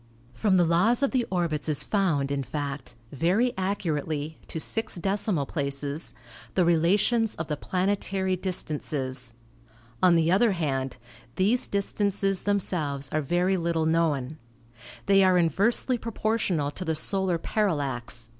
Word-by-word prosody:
From 195 - +2
the 175 - +4
laws 210 +11 +3
of 275 - +2
the 250 -3 0
orbits 165 -5 -1
is 150 - +2
found, 160 -9 0
in 140 -1 -1
fact, 140 -3 -5 0.2
very 185 - +1
accurately 160 -5 -2
(to 160 - -4
six 225 +7 0
decimal 195 -4 0
places) 140 +1 -4 0.4
the 180 - +3
relations 200 +7 +2
of 160 0 -5
the 150 - 0
planetary 190 +2 -1
distances. 140 -9 -4 0.7
On 180 -2 +5
the 165 0 +3
other 205 +3 +4
hand, 135 -7 -2 0.4
these 215 +7 +2
distances 200 -1 -1
themselves 155 -9 -1
are 155 - 0
very 175 +6 +1
little 165 -2 0
known. 155 -3 0 0.7
They 195 0 +5
are 185 -1 +4
inversely 205 - +2
proportional 215 -10 -1
to 185 - -6
the 160 -2 -1
solar 190 +2 +1
parallax 140 - -1
(8. - - -31
170 Hz, 135 wpm, -26 LUFS, 145-195 Hz, 0.7 s, On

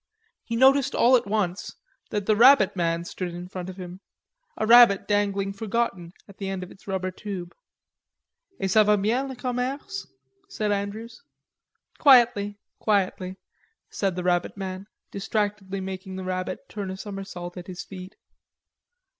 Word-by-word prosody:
He 230 - -4
noticed 270 +2 +4
all 250 +2 +5
at 240 -3 +1
once 200 -3 -2 0.3
that 205 -2 -2
the 215 - +3
rabbit 240 -3 +6
man 170 -1 0
stood 175 0 -5
in 175 +1 -7
front 185 -1 -6
of 185 - -9
him, 180 0 -8 0.6
a 220 - 0
rabbit 230 -3 +7
dangling 200 -1 0
forgotten 200 -4 -2 0.2
at 200 - -16
the 195 -1 -3
end 190 -1 -3
of 180 - -10
its 195 - -18
rubber 185 -1 -2
tube. 185 -2 -7 1.1
"Et 195 - 0
ca 215 +2 +6
va 210 0 +4
bien? 230 +7 0
le 265 - -6
commerce," 260 +10 -3 0.4
said 210 - -2
Andrews. 205 - -4 0.8
"Quietly, 230 -7 +5 0.2
quietly," 190 -3 0 0.5
said 195 -3 -1
the 180 - -3
rabbit 175 +2 0
man, 190 0 -6 0.2
distractedly 200 -1 -2
making 190 0 -6
the 190 - -5
rabbit 185 0 -4
turn 200 -3 -5
a 190 - -5
somersault 195 -3 -7
at 180 -1 -9
his 180 -2 -6
feet. 185 -1 -10
195 Hz, 155 wpm, -25 LUFS, 185-220 Hz, 1.1 s, rabbit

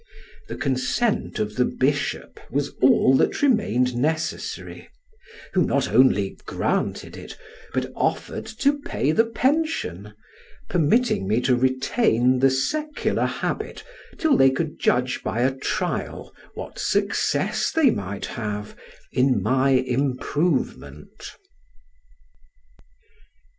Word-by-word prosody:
The - - -5
consent 145 - -1
of 105 0 -3
the 125 - +4
bishop 140 +3 -1
was 140 +2 -1
all 130 0 +5
that - - +1
remained 125 - +2
necessary, 155 +6 -3 0.6
who 185 - +3
not 140 -3 0
only 105 -7 +3
granted - - -2
it, - - -10 0.3
but - - -2
offered - - -2
to 280 +6 0
pay 150 - -1
the 225 +7 +3
pension, 230 - -1 0.6
permitting 175 - +2
me 110 +4 +2
to 125 0 +3
retain 130 - +2
the 135 +1 +5
secular 300 - -1
habit - - -4 0.3
till 315 -3 +3
they 135 - +6
could 150 +3 -3
judge 125 +1 +1
by 115 - -2
a 130 +2 +2
trial 135 - -3 0.2
what - - -8
success - - 0
they 315 -6 +4
might 100 - -4
have 105 -2 -5 0.4
in 130 0 +2
my 130 +1 +2
improvement. 135 +4 -1
135 Hz, 110 wpm, -23 LUFS, 125-185 Hz, 0.6 s, they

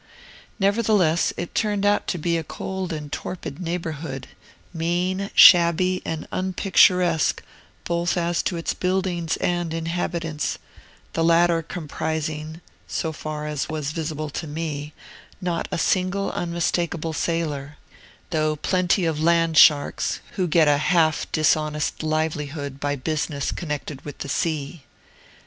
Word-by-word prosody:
Nevertheless, 200 -5 +2
it 175 - -5
turned 205 -2 0
out 205 0 +2
to 180 - -1
be 170 +1 0
a 165 - -1
cold 190 +3 -5
and 150 -2 -5
torpid 170 -4 -5
neighborhood, 160 -6 -4 0.5
mean, 180 +4 -1
shabby, 180 +1 +7
and 160 -1 -4
unpicturesque, 180 -3 +3 0.4
both 170 +1 0
as 170 0 +1
to 175 - -2
its 165 - -2
buildings 180 -3 -1
and 175 -2 -1
inhabitants: 165 -2 -2 0.6
the 165 - 0
latter 170 0 +4
comprising 160 -1 -4 0.3
(so 160 - -2
far 155 -1 -5
as 150 -1 -3
was 155 -2 -3
visible 155 -1 -4
to 160 - -5
me) 150 -1 -4 0.5
not 180 -3 -2
a - - -1
single 185 +3 +1
unmistakable 170 -1 -1
sailor, 150 -3 -2 0.5
though 155 -2 +1
plenty 180 +3 +1
of 155 -2 -1
land 165 0 +3
sharks, 145 -2 +4
who 185 -3 -1
get 160 -1 +4
a 145 -1 +4
half 155 0 +2
dishonest 155 -1 +1
livelihood 150 -3 -2
by 145 0 -1
business 145 0 -2
connected 150 -4 -5
with 145 - -8
the 140 - -6
sea. 155 +1 -2
165 Hz, 125 wpm, -23 LUFS, 150-175 Hz, 0.6 s, shabby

